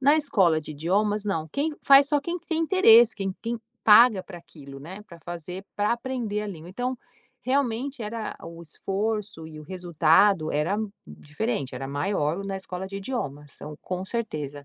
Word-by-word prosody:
Na 285 +3 +5
escola 190 - +2
de 155 - -9
idiomas 205 +7 0
não, 165 -6 -2
quem 300 +2 -1
faz 275 0 +7
só 290 -1 +2
quem 340 +5 -3
tem 330 -1 -3
interesse, 245 - +6
quem 195 -2 -3
quem 235 0 -4 0.2
paga 215 -2 +7
para 175 -2 -10
aquilo, 140 -5 -13
né, 185 +7 -9
pra 170 - -13
fazer, 175 +3 -7
pra 205 +2 +2
aprender 235 -4 -3
a 210 - -4
língua. 170 -4 -8
Então, 250 +6 -3 0.4
realmente 260 0 -1
era 220 0 -5
o 170 0 -10
esforço 200 +1 -3
e 155 - -11
o 155 - -10
resultado 175 0 +2
era 150 +7 0 0.3
diferente, 145 - -4
era 135 +1 -5
maior 155 +4 -1
na 195 -1 -3
escola 190 0 -6
de 195 - -7
idiomas, 150 - -5
são 150 0 -9
com 185 +1 -4
certeza. 150 - -4
195 Hz, 170 wpm, -25 LUFS, 160-235 Hz, 0.4 s, faz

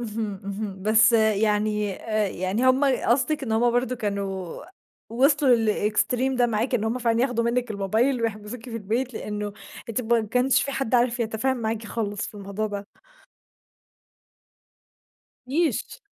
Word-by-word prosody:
اهم، 215 -4 -4
اهم. 200 -1 -5
بس 225 +3 +5
يعني 210 -2 +2
آآ 215 -2 -1
يعني 185 +8 -2
همّ 260 +2 +4
قصدك 270 +2 +1
إن 225 - -2
همّ 235 +2 +3
برضو 245 +1 0
كانوا 200 - -4 0.5
وصلوا 270 +1 +4 0.3
للExtreme 250 +4 0
ده 245 - +4
معاكِ، 230 +3 -1
إن 220 - +1
همّ 230 +3 -1
فعلًا 230 -1 +1
ياخدوا 245 -2 +1
منّك 240 0 0
الموبايل 220 +5 +1
ويحبسوكِ 220 +1 -4
في 230 - -5
البيت، 230 +4 -2
لأنّه 210 -1 -4 0.4
أنتِ 230 +1 -1
ما 235 -1 +2
كانش 250 +4 +2
في 275 - -3
حد 265 -3 -2
عارف 245 0 +2
يتفاهم 235 +4 0
معاكِ 225 -1 -3
خالص 205 -2 -3
في - - -11
الموضوع 200 +1 -4
ده. 205 -1 -5 2.6
نيش 310 - -1
225 Hz, 145 wpm, -25 LUFS, 210-250 Hz, 2.6 s, بس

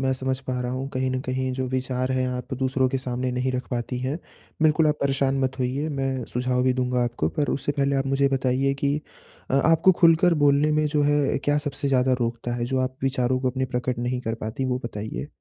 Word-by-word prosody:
मैं 130 0 +1
समझ 130 0 -2
पा 125 -1 -2
रहा 125 0 -2
हूँ। 130 +1 -3
कहीं 130 0 0
न 130 0 -1
कहीं 130 0 -1
जो 130 0 -2
विचार 130 0 -1
हैं, 130 0 +1
आप 125 +1 -5
दूसरों 130 0 +1
के 135 +1 -1
सामने 125 0 -2
नहीं 125 +1 -1
रख 125 0 -3
पाती 125 +1 -2
हैं। 135 +6 -2 0.4
बिल्कुल 155 0 +4
आप 150 - +3
परेशान 135 0 +1
मत 130 +1 -2
होइए, 130 +4 -1
मैं 135 -4 -2
सुझाव 125 0 0
भी 130 - +3
दूँगा 125 -1 0
आपको। 120 -10 -1
पर 145 - +1
उससे 145 - -1
पहले 140 0 +1
आप 135 0 0
मुझे 135 +1 +1
ये - - +5
बताइए 135 +1 +1
कि 140 +1 +2 0.5
अ - - +1
आपको 165 +3 +5
खुलकर 170 +1 +5
बोलने 145 0 +3
में 155 0 +2
जो 150 0 +1
है, 145 -1 +2
क्या 145 +1 +1
सबसे 145 -1 -2
ज़्यादा 130 -1 +3
रोकता 120 +1 -2
है? 120 - -2
जो 130 +2 -1
आप 130 0 -2
विचारों 130 -1 +1
को 130 - +1
अपने 130 +1 -1
प्रकट 125 -1 -2
नहीं 125 +1 -1
कर 115 -2 -2
पाती, 110 +5 -3
वो 125 -1 0
बताइए? 110 +4 -5
130 Hz, 235 wpm, -24 LUFS, 125-140 Hz, 0.5 s, ये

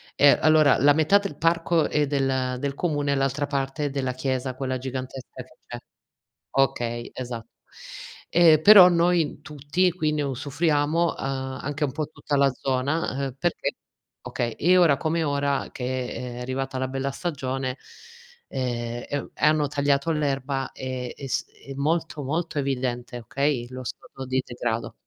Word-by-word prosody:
Ehm, 145 - +6
allora 155 -2 +5
la 145 +1 +6
metà 160 +6 +4
del 200 -7 -6
parco 165 0 +2
è 150 -1 +1
del 135 -1 0
ehm, 130 -1 0
del 140 0 -3
comune 145 -3 -1
e - - +1
l'altra 140 +1 0
parte 140 +1 -2
è - - 0
della 135 -2 -2
chiesa, 130 0 -2
quella 130 -1 -2
gigantesca 130 0 -6
che 130 - -23
c'è. 120 - -6 0.7
Okay, 120 -3 0
esatto, 120 -3 -6 0.8
ehm, 165 -3 +6
però 195 -1 +10
noi 170 -3 +2
tutti, 150 +5 0
quindi 155 -4 -1
usufruiamo, 145 +4 0
uhm, 130 -1 -3
anche 145 +2 -2
un 135 - -1
po' 150 +1 -2
tutta 150 -1 -3
la 140 0 +4
zona, 135 +2 -1
ehm, 130 - -6
perché 175 +2 -1 0.5
okay, 120 -2 -3
e 175 +10 +3
ora 165 -6 +5
come 165 0 0
ora, 140 -1 0
che 125 0 -3
è 125 -1 -6
arrivata 130 +1 -3
la 130 0 -1
bella 135 +1 -2
stagione, 135 -5 -3 0.7
ehm, 120 -2 -3
e 145 - -1
u - - -8
e - - -2
hanno 150 -1 +3
tagliato 140 +1 +1
l'erba 135 -3 -2
e 130 -1 -5
e 135 - -7
s - - -1 0.2
è 135 - -6
molto 155 +1 -1
molto 155 +2 -2
evidente, 125 -3 -2
okay, 130 +1 -1
lo 130 0 -8
stato 135 +2 -8
di 130 0 0
degrado. 115 -1 -3
140 Hz, 165 wpm, -25 LUFS, 130-150 Hz, 0.8 s, però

